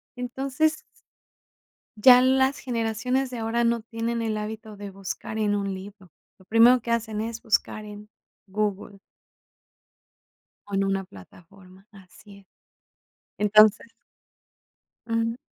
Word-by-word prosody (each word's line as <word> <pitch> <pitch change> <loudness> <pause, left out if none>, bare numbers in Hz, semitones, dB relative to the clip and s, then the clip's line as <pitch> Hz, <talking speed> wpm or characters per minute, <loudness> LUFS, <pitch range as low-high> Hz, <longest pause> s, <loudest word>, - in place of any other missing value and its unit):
Entonces 270 +5 -1 1.2
ya 250 +2 +8
las 265 +1 +2
generaciones 250 +2 -2
de 245 - -5
ahora 225 +1 0
no 235 -1 +1
tienen 230 +1 -3
el 220 -1 -2
hábito 215 0 -7
de 200 0 -8
buscar 195 +3 -6
en 205 -1 +1
un 200 -1 -2
libro. 190 -2 -11 0.3
Lo 190 - -21
primero 235 +4 +6
que 235 0 -5
hacen 220 -2 -1
es 230 0 -5
buscar 215 0 -1
en 210 0 -11 0.4
Google. 200 0 -3 1.7
O 200 - -12
en 195 0 +1
una 195 0 -1
plataforma, 185 - -17
así 200 +1 -16
es. 195 - -22 0.9
Entonces 215 +2 +4 1.2
Ujú. 230 +1 -1
215 Hz, 120 wpm, -25 LUFS, 200-235 Hz, 1.7 s, ya